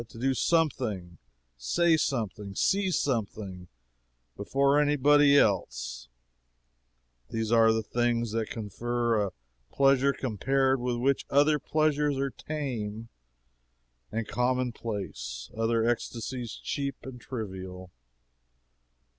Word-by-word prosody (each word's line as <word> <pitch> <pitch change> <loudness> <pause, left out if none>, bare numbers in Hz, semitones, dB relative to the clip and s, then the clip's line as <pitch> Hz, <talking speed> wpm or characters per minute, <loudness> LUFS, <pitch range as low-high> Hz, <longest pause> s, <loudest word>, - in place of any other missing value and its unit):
To 115 - -14
do 135 +3 +1
something, 110 - 0 0.4
say 165 - +2
something, 105 - -2
see 195 - +2
something, 105 - -2 0.7
before 140 +7 +2
any 145 0 +2
body 145 0 +5
else - - 0 1.2
these 115 -1 -2
are 115 -1 +6
the 110 0 0
things 120 0 0
that 110 -1 -2
confer 115 +1 -1
a - - -7 0.4
pleasure 135 0 +4
compared 135 +2 0
with 125 0 -1
which 130 +3 0
other 145 +2 +4
pleasures 150 -1 +1
are 135 0 -1
tame 115 -9 -5 1.0
and 115 0 -3
commonplace, 120 - -3
other 115 0 +1
ecstasies 120 0 -2
cheap 140 -2 -3
and 125 -2 -9
trivial. 95 -6 -7
120 Hz, 105 wpm, -28 LUFS, 105-140 Hz, 1.2 s, are